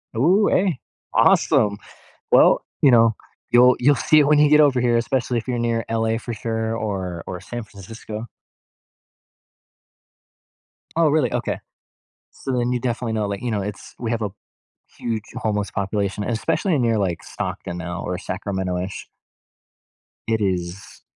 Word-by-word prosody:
Ooh, 180 - +4
hey. 185 -7 +1 0.3
Awesome. 100 -1 +4 0.6
Well, - - +5 0.2
you 140 - +7
know, 115 -2 +5 0.4
you'll 125 +1 +6
you'll 145 +4 +4
see 155 +4 +4
it 145 - +4
when 150 0 +4
you 150 0 +6
get 150 +1 +6
over 140 -4 +4
here, 120 -1 +2
especially 125 +1 0
if 115 - -6
you're 125 -1 -1
near 115 -1 0
LA 115 0 +1
for 120 - -6
sure 110 0 -2
or 95 -6 -3
or 90 -1 -6
San 120 0 -6
Francisco. 105 +3 -9 2.7
Oh, 165 -1 +4
really? 145 -6 +2
Okay. - - -2 0.7
So 130 - -4
then 120 0 0
you 125 - 0
definitely 120 -2 -2
know, 105 -2 -1
like, 100 -1 -4
you 125 - -2
know, 105 -2 -1
it's 105 +1 -7
we 115 -2 -2
have 115 -1 -1
a 105 - -1 0.7
huge 115 -3 -3
homeless 105 -2 -2
population- 100 +1 -2
and 120 - -2
especially 165 - 0
near, 115 -3 +2
like, 95 -5 -1
Stockton 85 - -5
now 90 +1 -5
or 90 - -2
Sacramento-ish. 95 -1 -4 1.2
It 110 -1 0
is. 90 -1 -3
115 Hz, 155 wpm, -22 LUFS, 100-125 Hz, 2.7 s, you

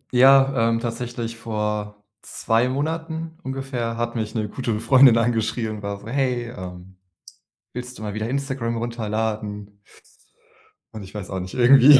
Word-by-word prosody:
Ja, 135 -2 +6
ähm, 115 0 +1
tatsächlich 115 0 -4
vor 105 -2 -3 0.2
2 115 +3 +1
Monaten 160 +3 -3
ungefähr 130 -5 -3
hat 120 0 -2
mich 110 0 -3
'ne 110 -1 0
gute 115 -1 -2
Freundin 125 0 +7
angeschrieben, 110 -2 0
war 100 0 -4
so: - - -11
„Hey, 125 -2 0
ähm, 90 -1 -9 0.8
willst 125 0 -6
du - - -9
mal 105 -1 -4
wieder 110 +2 -2
Instagram 130 -4 -2
runterladen?“ 105 -3 -3 1.2
Und, 110 - -7
ich 95 - -12
weiß 100 -2 -6
auch 95 - -2
nicht, 90 +4 -6
irgendwie 135 +2 +8
115 Hz, 145 wpm, -23 LUFS, 105-130 Hz, 1.2 s, irgendwie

